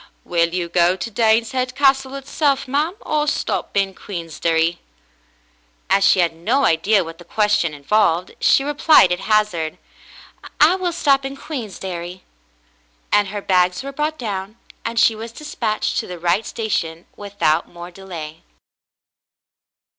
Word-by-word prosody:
*'Will 170 -1 +1
you 175 -1 -2
go 175 +1 +3
to 230 +5 -6
Daneshead 230 +3 +1
Castle 270 -1 +2
itself, 275 0 -1
ma'm, 295 +7 0
or 300 0 -1
stop 285 - -2
in 195 -1 +1
Queensderry 165 -2 -2 0.6
?'* - - -39
As 200 - +4
she 185 - +5
had 170 -1 0
no 240 +12 +1
idea 190 +5 +3
what 165 0 -10
the - - -11
question 210 -3 +1
involved, 175 +3 +1
she 270 - +4
replied 295 - +5
at 180 - 0
hazard. 210 -8 0 0.8
'*I 310 +4 +6
will 370 -2 -1
stop 280 -5 +2
in 270 0 -6
Queensderry." 185 - -6 0.9
And 205 -1 +3
her 205 +1 -6
bags 180 +2 +2
were 275 - -6
brought 300 +2 -2
down, 205 -3 -5 0.3
and 230 0 -2
she 225 - +5
was 225 +1 -8
despatched 230 -5 -2
to - - -5
the 180 - -7
right 175 +6 0
sta 225 - -4
tion 165 -5 -2
without 200 -6 -1
more 175 +1 -10
delay. 170 -5 -9
200 Hz, 145 wpm, -20 LUFS, 170-260 Hz, 0.9 s, I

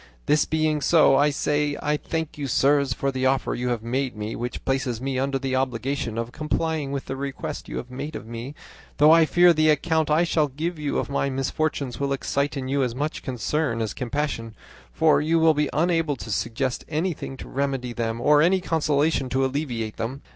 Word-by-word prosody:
This 150 - +3
being 155 -1 0
so, 155 -1 +5
I 145 +2 +4
say 145 0 0
I 150 0 0
thank 160 +1 -4
you, 145 -2 -4
sirs, 140 +2 +3
for 140 +2 -1
the 130 0 0
offer 135 0 +1
you 125 +1 -2
have 120 -3 -2
made 130 +2 -2
me, 105 +1 -4
which 120 0 -5
places 130 -3 -1
me 130 0 -2
under 135 0 0
the 135 -1 -2
obligation 130 -1 -2
of 115 +1 -3
complying 155 0 -2
with 140 -1 -3
the 135 - -4
request 135 0 -5
you - - -4
have 125 - -6
made 140 +4 -6
of - - -6
me; 120 +5 -7 0.4
though 150 +2 +7
I 165 -1 +6
fear 175 +1 +6
the 155 0 +3
account 160 +1 +2
I 155 +3 +4
shall 160 -3 +2
give 155 +5 -4
you 150 -2 -1
of - - -1
my 140 0 0
misfortunes 135 0 -2
will 140 0 0
excite 140 +2 -1
in 130 -1 -4
you 140 +1 +1
as 125 -3 -1
much 150 +3 -3
concern 130 0 -1
as 110 -2 -2
compassion, 125 -4 -3 0.4
for 155 -3 +3
you 160 +2 +2
will 160 -1 +5
be 150 -1 0
unable 165 -2 +1
to 115 -3 -8
suggest 115 +5 -2
anything 155 -3 -3
to - - -9
remedy 135 -3 -2
them 115 -1 -2
or 145 +4 +5
any 185 +4 +4
consolation 150 -4 +1
to 135 +1 +1
alleviate 125 -6 -3
them. 130 +5 -4
140 Hz, 205 wpm, -24 LUFS, 130-155 Hz, 0.4 s, though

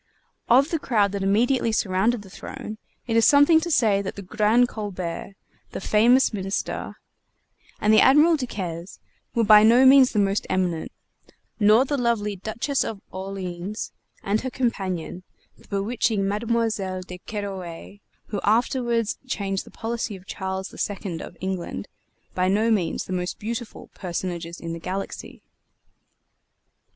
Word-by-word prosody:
Of 270 +5 +5
the 330 - 0
crowd 210 -8 +1
that 200 -1 -3
immediately 230 +5 +2
surrounded 205 +2 +1
the 195 - -14
throne, 215 +2 -8 0.3
it 230 - -1
is 230 - +5
something 290 +3 +6
to 345 - -3
say 220 -10 +3
that 195 - -5
the 200 - -7
Grand 215 +5 +3
Colbert, 195 -4 -5 0.4
the - - -4
famous 235 +6 +4
Minister, 195 0 -3 0.8
and 210 +1 +3
the 215 - +7
Admiral 300 +5 +6
Duquesne 185 - -4 0.5
were 230 - +3
by 210 -1 +8
no 235 +4 +6
means 265 -1 +7
the - - -3
most 200 0 +1
eminent, 180 -3 -1 0.7
nor 215 +4 +5
the 285 0 -1
lovely 220 -4 0
Duchess 220 +8 -2
of 220 -3 -5
Orleans 190 +1 -5 0.3
and 205 +2 0
her 260 - -3
companion, 190 -9 -2 0.3
the - - -22
bewitching 205 0 0
Mademoiselle 210 -3 -1
de 180 0 -9
Kerouaille, 195 -2 -7 0.3
who 205 -2 -3
afterward 235 +1 +1 0.2
changed 195 -5 -3
the - - -10
policy 230 -2 -4
of 185 0 -13
Charles 190 -1 -5
II, 190 -4 -4
of 175 - -10
England, 190 -2 -4 0.5
by 185 0 +1
no 215 +4 +2
means 180 -7 0
the 185 - -6
most 180 0 -3
beautiful 230 +2 -6
personages 175 -2 -5
in 165 -1 -5
the 165 - -6
galaxy. 190 +4 -6
205 Hz, 145 wpm, -24 LUFS, 190-235 Hz, 0.8 s, by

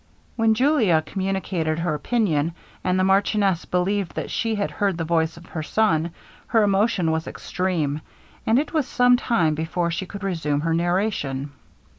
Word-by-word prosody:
When 225 -1 +3
Julia 225 - +3
communicated 190 -5 -2
her 165 -1 -1
opinion, 165 -4 0 0.3
and 185 0 +1
the - - +3
marchioness 195 -1 +2
believed 190 +1 -1
that - - -4
she 225 -1 0
had 200 -1 -1
heard 195 -4 0
the 165 - -2
voice 165 0 0
of 170 - -13
her 160 - -5
son 165 -1 +1 0.4
her 225 -2 +3
emotion 200 -4 +2
was 160 0 -2
extreme, 160 -6 -2 0.4
and 225 - +3
it 295 +5 -1
was 305 -5 +1
some 245 0 +4
time 185 -11 +1
before 165 +2 -1
she 180 +3 -3
could 200 +2 -8
resume 160 -6 -1
her 165 +1 0
narration. 170 -6 -1
180 Hz, 165 wpm, -23 LUFS, 160-210 Hz, 0.4 s, some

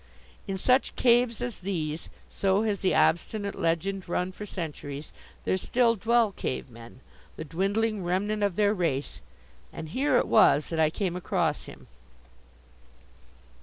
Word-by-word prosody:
In 195 - -2
such 255 +7 +2
caves 240 -1 +3
as 245 -3 -4
these 165 -5 -3 0.2
so 195 +2 +1
has 210 -3 0
the 190 - +1
obstinate 200 +4 +1
legend 175 +3 -1
run 180 +1 -1
for 210 +3 -8
centuries 150 -5 -6 0.3
there 185 - +1
still 235 +4 +2
dwell 230 0 +2
cave 130 -7 -4
men, 115 +2 -13 0.3
the 160 - -6
dwindling 200 +6 -1
remnant 200 +4 -1
of 200 -3 +1
their 205 0 +3
race. 165 -8 -2 0.5
And 160 - -7
here 270 - +2
it - - +1
was 145 +2 +5
that 165 - -2
I 155 -1 +4
came 180 +1 -2
across 180 - -1
him. - - -12
190 Hz, 145 wpm, -27 LUFS, 165-215 Hz, 0.5 s, was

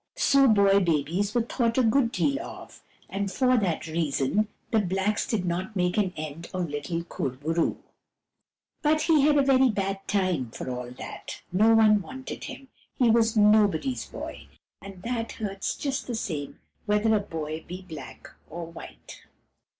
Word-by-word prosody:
So 275 -1 +5
boy 200 -3 +5
babies 175 - 0
were 240 - +3
thought 230 0 0
a 260 - +4
good 230 +1 +3
deal 280 +2 +1
of, - - -11 0.3
and 200 0 -3
for 255 +2 +3
that 190 -9 0
reason 160 +4 0 0.2
the 225 - +4
blacks 195 +2 0
did 205 -5 -1
not 185 +5 -3
make 180 -1 +1
an 200 -4 +1
end 155 +1 -6
of 175 -4 -2
little 145 +4 -3
Kur 155 - -3
bo 135 +5 -7
roo. 165 0 0 1.0
But 310 0 +2
he 315 -4 +4
had 295 +1 +4
a 280 - +5
very 265 -1 +5
bad 195 -2 -1
time, 185 - 0
for - - -7
all 125 -1 -5
that. 125 - -8
No 215 +5 +5
one 215 -2 +5
wanted 265 +5 -7
him. 270 - -9 0.3
He 240 -3 +4
was 225 -1 +3
nobody's 210 - +3
boy; - - -8 0.3
and 195 -2 -11
that 230 -1 -3
hurts 195 -3 -3
just 275 -2 -3
the 240 - -2
same 150 -10 -4 0.3
whether 210 +2 +3
a - - +3
boy 160 -5 -5
be 185 +2 -7
black 160 -5 -10 0.2
or 170 +2 -6
white. 165 0 -11
200 Hz, 170 wpm, -27 LUFS, 170-230 Hz, 1.0 s, So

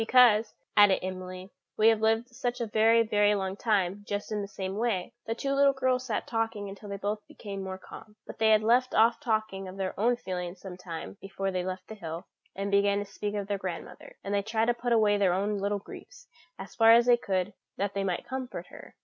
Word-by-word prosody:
"Because," 225 -2 +5 0.2
added 205 -2 +6
Emily, 185 0 -6 0.3
"we 220 +1 +6
have 220 -1 +2
lived 225 +2 +2
such 245 0 -3
a 235 - -1
very, 225 +1 +4
very 210 -1 +3
long 190 -1 -2
time 200 -2 0
just 205 +1 -3
in 210 -1 -1
the 200 - -5
same 190 -1 -5
way." 215 -6 -1
The 225 - -1
two 275 +3 -2
little 280 0 +4
girls 255 -1 0
sat 220 - -2
talking 225 -2 -2
until 200 +1 -10
they 200 - -4
both 205 +2 -2
became 205 -10 -7
more 190 0 -5
calm; 210 +2 -13
but - - -10
they 220 0 +4
had 215 0 +5
left 245 +3 +3
off 230 +2 +4
talking 215 -7 -2
of 185 +1 -9
their 190 -1 -2
own 240 +3 +3
feelings 180 -4 -5
some 185 -1 -8
time 180 +1 -8
before 195 0 -3
they 185 -1 -1
left 185 0 -5
the - - -8
hill, 170 -3 -7 0.3
and 200 +1 -3
began 200 0 +3
to 205 - -2
speak 205 +1 -5
of 205 -1 -2
their 200 0 -2
grandmother; 185 -3 -7
and 200 - -3
they 200 - +2
tried 220 +2 0
to - - +4
put 240 0 -3
away 215 -3 +4
their 190 -3 +3
own 200 +2 -1
little 200 +1 0
griefs, 350 - -12 0.3
as 190 -1 -9
far 225 -1 +6
as 235 +1 +6
they 245 -1 +6
could, 195 -4 -2 0.2
that 200 0 -1
they 200 - -1
might 185 -2 -2
comfort 260 -1 -5
her. - - -13
205 Hz, 230 wpm, -29 LUFS, 195-225 Hz, 0.3 s, added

